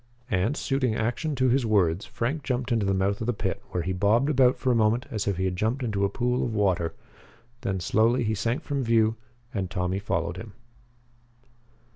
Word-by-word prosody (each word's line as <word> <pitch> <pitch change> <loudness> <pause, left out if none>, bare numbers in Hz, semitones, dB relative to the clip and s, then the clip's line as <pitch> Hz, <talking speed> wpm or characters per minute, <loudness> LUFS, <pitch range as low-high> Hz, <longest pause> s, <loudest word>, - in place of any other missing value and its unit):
And, 95 +10 +1
suiting 130 -5 0
action 120 +7 -1
to 130 -1 +2
his 130 +2 +2
words, 100 -4 +2
Frank 140 +7 -2
jumped 125 -1 -2
into 110 -4 +1
the 95 - +2
mouth 100 +2 0
of 110 - -2
the 120 - +2
pit 95 -2 -3
where 90 - -2
he 95 +2 -2
bobbed 110 +9 +2
about 130 -2 +4
for 130 - +1
a - - +3
moment 115 +3 +2
as 105 -3 -2
if 100 -3 0
he 95 - 0
had 90 -1 -1
jumped 115 +8 -1
into 105 -4 -1
a 100 - +2
pool 125 +3 0
of 115 -3 -2
water. 95 -5 +1 0.7
Then 95 -6 -2
slowly 115 +8 +2
he 110 0 0
sank 115 +8 -1
from 140 -2 -2
view, 115 -1 +3 0.4
and 95 -4 -2
Tommy 95 0 -1
followed 85 -3 -2
him. 105 +2 -9
110 Hz, 205 wpm, -26 LUFS, 95-125 Hz, 0.7 s, about